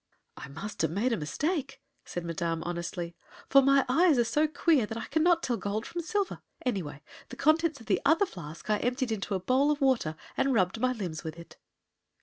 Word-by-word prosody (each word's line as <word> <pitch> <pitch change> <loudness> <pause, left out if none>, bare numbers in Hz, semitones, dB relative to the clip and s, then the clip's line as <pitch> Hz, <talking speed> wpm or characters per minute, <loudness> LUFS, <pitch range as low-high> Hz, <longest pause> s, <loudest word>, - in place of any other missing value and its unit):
"I - - -8
must 165 +10 -6
have - - +2
made 215 +9 0
a - - +3
mistake," 275 - -2 0.3
said 175 -1 -5
Madame, 165 -1 -2
honestly; 170 0 -4 0.3
"for 275 - +7
my 275 0 +4
eyes 315 +3 +4
are 240 - +4
so 295 +7 +2
queer 300 -5 +2
that 225 - -5
I 230 - -4
cannot 335 +1 +2
tell 240 -2 0
gold 210 +2 -3
from 345 - -4
silver. 400 +3 -2 0.2
Anyway, 170 - -3 0.3
the - - -8
contents 315 0 +2
of 230 - -13
the 210 -3 +1
other 325 +7 +4
flask 165 - -10
I 210 - +3
emptied 250 0 -1
into 205 -2 -2
a - - 0
bowl 260 +9 +2
of 300 -1 +1
water, 255 - +2 0.2
and 270 -1 +2
rubbed 185 +1 +1
my 255 +2 +2
limbs 185 -10 -4
with 160 0 -6
it." 170 - -12
235 Hz, 205 wpm, -29 LUFS, 175-285 Hz, 0.3 s, for